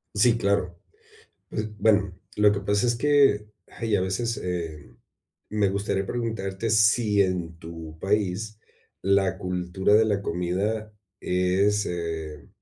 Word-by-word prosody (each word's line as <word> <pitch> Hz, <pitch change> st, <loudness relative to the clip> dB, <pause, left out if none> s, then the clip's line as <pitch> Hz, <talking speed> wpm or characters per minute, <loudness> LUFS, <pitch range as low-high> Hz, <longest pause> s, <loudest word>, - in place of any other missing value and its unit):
Sí, 115 Hz, +2 st, +4 dB
claro, 95 Hz, -4 st, 0 dB, 0.7 s
es 105 Hz, 0 st, -4 dB
Bueno, 100 Hz, -4 st, +2 dB, 0.2 s
lo 105 Hz, 0 st, +5 dB
que 100 Hz, -, -2 dB
pasa 100 Hz, +4 st, +1 dB
es 120 Hz, -, +2 dB
que, 135 Hz, -6 st, +3 dB, 0.2 s
ay, 115 Hz, -3 st, -2 dB
a -, -, 0 dB
veces, 105 Hz, +5 st, -1 dB
eh, 80 Hz, -8 st, -5 dB, 0.6 s
me 105 Hz, -2 st, +2 dB
gustaría 100 Hz, -1 st, -1 dB
preguntarte 110 Hz, -3 st, -3 dB
si 105 Hz, -1 st, +4 dB
en 90 Hz, -3 st, 0 dB
tu 80 Hz, -1 st, -9 dB
país 105 Hz, +2 st, -1 dB, 0.4 s
la 95 Hz, -1 st, +2 dB
cultura 90 Hz, +1 st, 0 dB
de 110 Hz, +1 st, +6 dB
la 100 Hz, -2 st, 0 dB
comida 100 Hz, +5 st, -2 dB, 0.3 s
es, 95 Hz, +3 st, +1 dB
eh, 80 Hz, -3 st, -5 dB
100 Hz, 130 wpm, -25 LUFS, 90-105 Hz, 0.7 s, de